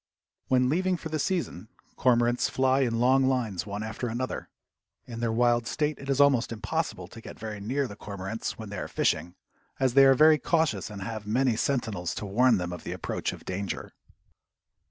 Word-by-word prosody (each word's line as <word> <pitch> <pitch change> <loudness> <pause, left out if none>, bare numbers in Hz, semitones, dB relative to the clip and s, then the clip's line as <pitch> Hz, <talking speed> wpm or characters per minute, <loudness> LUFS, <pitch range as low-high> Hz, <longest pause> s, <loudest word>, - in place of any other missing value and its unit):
When 125 -1 +3
leaving 180 +6 +1
for 160 - -7
the 155 0 -2
season 145 - -2 0.3
cormorants 120 -1 +2
fly 130 0 +2
in 120 -4 +1
long 130 +2 +4
lines 110 -9 -1
one 100 +1 -4
after 110 +3 -4
another. 120 +3 -4 0.6
In 115 -1 -7
their 115 -1 0
wild 120 0 +2
state 150 +2 -1
it 140 - -8
is 135 0 +1
almost 140 -5 +4
impossible 160 +9 -3
to 115 - -12
get - - -10
very 110 -2 -6
near 130 +7 -1
the 105 - -9
cormorants 100 +2 -5
when 110 -2 -8
they 100 - -4
are - - -4
fishing, 90 +1 0 0.4
as 130 -2 +2
they 135 +1 +7
are 135 0 +6
very 155 +2 +6
cautious 160 -7 0
and 100 -2 -7
have 110 -1 -6
many 125 +2 +2
sentinels 110 - -1
to - - -4
warn 115 +4 +4
them 90 -1 -3
of 90 - -8
the - - -4
approach - - -3
of - - -11
danger. 95 0 -4
120 Hz, 195 wpm, -27 LUFS, 105-135 Hz, 0.6 s, they